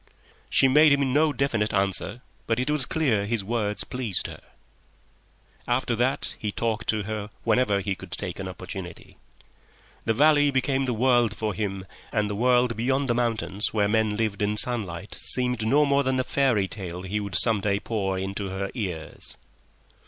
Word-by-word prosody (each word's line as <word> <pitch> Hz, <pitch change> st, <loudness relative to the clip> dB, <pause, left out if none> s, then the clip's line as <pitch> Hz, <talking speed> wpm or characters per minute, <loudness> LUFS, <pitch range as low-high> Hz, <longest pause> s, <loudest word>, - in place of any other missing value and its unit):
She 135 Hz, -, +4 dB
made 150 Hz, +3 st, +6 dB
him 140 Hz, -2 st, +2 dB
no 155 Hz, +2 st, +3 dB
definite 120 Hz, -7 st, 0 dB
answer, 95 Hz, +5 st, 0 dB, 0.2 s
but 115 Hz, +1 st, +1 dB
it 130 Hz, +4 st, 0 dB
was 150 Hz, -4 st, +1 dB
clear 120 Hz, -11 st, +1 dB
his 115 Hz, -2 st, -1 dB
words 105 Hz, -1 st, -1 dB
pleased 125 Hz, -7 st, -3 dB
her. -, -, -7 dB, 1.3 s
After 120 Hz, -1 st, 0 dB
that 125 Hz, +4 st, 0 dB
he 105 Hz, -, -2 dB
talked 110 Hz, -1 st, -2 dB
to 110 Hz, -1 st, +1 dB
her 105 Hz, 0 st, -4 dB
whenever 110 Hz, -3 st, +2 dB
he 100 Hz, +1 st, -1 dB
could -, -, -10 dB
take -, -, -4 dB
an -, -, -4 dB
opportunity. 90 Hz, -3 st, -8 dB, 0.9 s
The 110 Hz, -, +1 dB
valley 145 Hz, +1 st, +5 dB
became 135 Hz, 0 st, 0 dB
the 125 Hz, -2 st, -1 dB
world 120 Hz, -2 st, +3 dB
for 110 Hz, -2 st, -2 dB
him, 95 Hz, -2 st, -3 dB, 0.3 s
and 105 Hz, -2 st, 0 dB
the -, -, -3 dB
world 125 Hz, +1 st, +3 dB
beyond 130 Hz, +4 st, 0 dB
the -, -, +3 dB
mountains 115 Hz, -3 st, -1 dB
where 105 Hz, -1 st, +3 dB
men 110 Hz, -1 st, +1 dB
lived 110 Hz, -3 st, -1 dB
by 105 Hz, -4 st, -1 dB
day -, -, -16 dB
seemed 125 Hz, -3 st, +3 dB
no 145 Hz, +5 st, +4 dB
more 140 Hz, 0 st, +3 dB
than 130 Hz, -1 st, 0 dB
a -, -, +2 dB
fairy 125 Hz, -8 st, +1 dB
tale 90 Hz, -3 st, -6 dB
he 100 Hz, +3 st, -2 dB
would 100 Hz, -4 st, -5 dB
some 110 Hz, +2 st, +4 dB
day 100 Hz, 0 st, 0 dB
pour 100 Hz, -4 st, -2 dB
into 95 Hz, +1 st, -4 dB
her 95 Hz, +1 st, -4 dB
ears. 90 Hz, -, -5 dB
110 Hz, 175 wpm, -25 LUFS, 100-130 Hz, 1.3 s, made